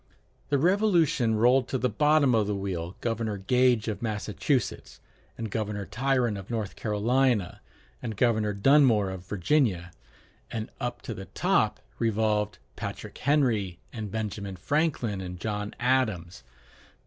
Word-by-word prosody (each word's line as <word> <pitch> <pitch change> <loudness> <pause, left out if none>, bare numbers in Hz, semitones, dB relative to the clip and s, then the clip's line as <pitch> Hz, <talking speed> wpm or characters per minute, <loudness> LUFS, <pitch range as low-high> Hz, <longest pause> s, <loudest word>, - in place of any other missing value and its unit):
The 140 - +3
Revolution 170 - +3
rolled 125 +3 +4
to 130 - -1
the 125 - +1
bottom 145 +3 +3
of 110 -3 +2
the 105 - -1
wheel 90 -3 -4
Governor 115 -2 -2
Gage 125 +3 +2
of 110 - -3
Massachusetts, 110 +4 -2 0.4
and 110 -3 -5
Governor 105 -2 -2
Tryon 125 -2 0
of 95 0 -9
North 110 -5 -3
Carolina, 110 -1 +1 0.4
and 110 -3 -5
Governor 110 -3 +2
Dunmore 110 -3 +4
of 95 -1 -8
Virginia; 95 - +1 0.6
and 110 -1 -5
up 120 0 -4
to 115 - -4
the 95 -2 -8
top - - +1 0.2
revolved 105 -2 +1 0.2
Patrick - - -7
Henry, 115 - +1 0.2
and 110 -3 -5
Benjamin 100 -2 -4
Franklin, 120 - 0
and 90 -1 -7
John 105 +1 -3
Adams. 110 - 0
110 Hz, 135 wpm, -27 LUFS, 100-125 Hz, 0.6 s, rolled